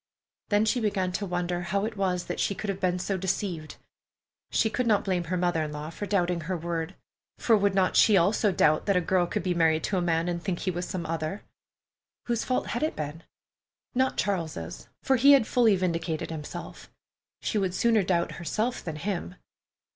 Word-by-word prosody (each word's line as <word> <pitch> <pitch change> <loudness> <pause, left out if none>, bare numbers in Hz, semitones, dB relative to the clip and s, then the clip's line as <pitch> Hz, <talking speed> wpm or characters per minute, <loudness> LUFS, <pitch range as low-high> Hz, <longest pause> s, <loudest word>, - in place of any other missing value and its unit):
Then 205 0 +3
she 235 +3 +1
began 195 -4 0
to 200 +2 -3
wonder 175 0 -1
how 195 +4 -1
it 225 0 -4
was 185 -3 0
that - - -4
she 200 - 0
could 205 0 -2
have 190 - -6
been 180 -1 +1
so 190 +2 -2
deceived. 180 -4 -3 0.7
She - - +2
could 240 +3 -1
not 210 -2 +3
blame 180 -3 0
her 180 +3 -1
mother 175 -2 +1
in 155 -1 -3
law 150 +1 -6
for 205 +5 -5
doubting 180 -4 +1
her 180 +3 -3
word, 170 +1 -3 0.4
for 230 - +4
would 200 -2 +2
not 190 -1 +2
she 210 -3 +6
also 200 +4 +3
doubt 155 -2 +2
that 200 - +3
a - - +5
girl 180 0 +1
could - - -2
be 180 -1 +1
married 160 -2 +2
to 195 - 0
a - - +1
man 165 -1 +1
and 170 -1 -2
think 175 -1 -3
he 185 - 0
was 175 0 -4
some 175 -3 -4
other? 160 +4 -3 0.8
Whose 235 -2 0
fault 255 - 0
had 240 - -2
it 310 - 0
been? 150 +2 -5 0.7
Not 260 +1 +1
Charles's, 160 - -3 0.2
for 265 - +3
he 280 +4 +7
had 270 -5 +5
fully 230 -4 +4
vindicated 170 -3 -2
himself. 150 -2 -7 0.5
She 215 - 0
would 190 -2 -1
sooner 230 0 +3
doubt 175 -2 0
herself 220 +8 -2
than 160 -3 -4
him. 180 +2 -4
185 Hz, 205 wpm, -27 LUFS, 170-205 Hz, 0.8 s, he